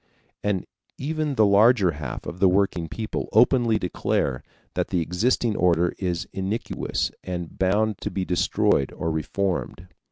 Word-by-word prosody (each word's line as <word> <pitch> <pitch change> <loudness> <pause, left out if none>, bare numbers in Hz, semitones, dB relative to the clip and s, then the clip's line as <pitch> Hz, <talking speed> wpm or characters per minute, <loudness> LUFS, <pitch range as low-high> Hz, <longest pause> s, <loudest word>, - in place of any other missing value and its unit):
And 100 -3 0 0.3
even 150 0 -2
the 110 - +5
larger 100 -1 +5
half 70 -4 -6
of 90 - -7
the 95 0 +5
working 90 -3 +1
people 110 +6 -4
openly 120 -4 +4
declare 80 -8 -1 0.3
that - - -1
the 90 - 0
existing 105 +7 +1
order 85 -1 +2
is 90 -3 -2
iniquitous 95 +4 -2
and 90 -2 -6
bound 105 +2 +1
to - - -3
be 95 -2 -3
destroyed 85 -6 +1
or 80 - -2
reformed. 90 +3 -2
95 Hz, 140 wpm, -24 LUFS, 85-110 Hz, 0.3 s, the